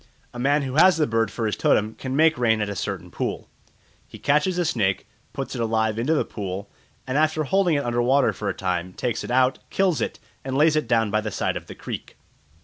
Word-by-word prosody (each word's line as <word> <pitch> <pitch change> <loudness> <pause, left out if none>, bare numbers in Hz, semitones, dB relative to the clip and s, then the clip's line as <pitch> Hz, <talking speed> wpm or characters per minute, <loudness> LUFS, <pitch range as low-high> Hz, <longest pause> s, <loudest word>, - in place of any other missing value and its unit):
A 120 - -7
man 140 +3 +2
who 135 +1 -3
has 185 +2 +6
the 155 - +3
bird 115 -4 +1
for 115 - -3
his 105 - 0
totem 110 +1 +2
can 130 +2 -5
make 160 +2 +4
rain 115 -4 +2
at 105 -1 -1
a 100 - -4
certain 90 -2 -4
pool. - - -4 0.6
He - - -11
catches 150 +6 +1
a 175 - +1
snake, 105 -11 0 0.2
puts - - -5
it 120 - -3
alive 110 -1 0
into 145 +8 +1
the - - +1
pool, 100 -1 -6 0.3
and 130 +3 0
after 155 0 +2
holding 180 +1 +2
it 140 - -1
under 120 0 0
water 130 +2 +3
for 105 - -3
a - - -1
time 90 -1 -2
takes 120 +2 -2
it - - -7
out, 130 +1 +2
kills 190 -5 +1
it, - - -2 0.3
and 135 0 -2
lays 155 +1 +4
it 155 -5 0
down 115 -3 +2
by 110 +1 +1
the 105 - -3
side - - -1
of - - -6
the - - -9
creek. - - -7
125 Hz, 235 wpm, -24 LUFS, 110-150 Hz, 0.6 s, has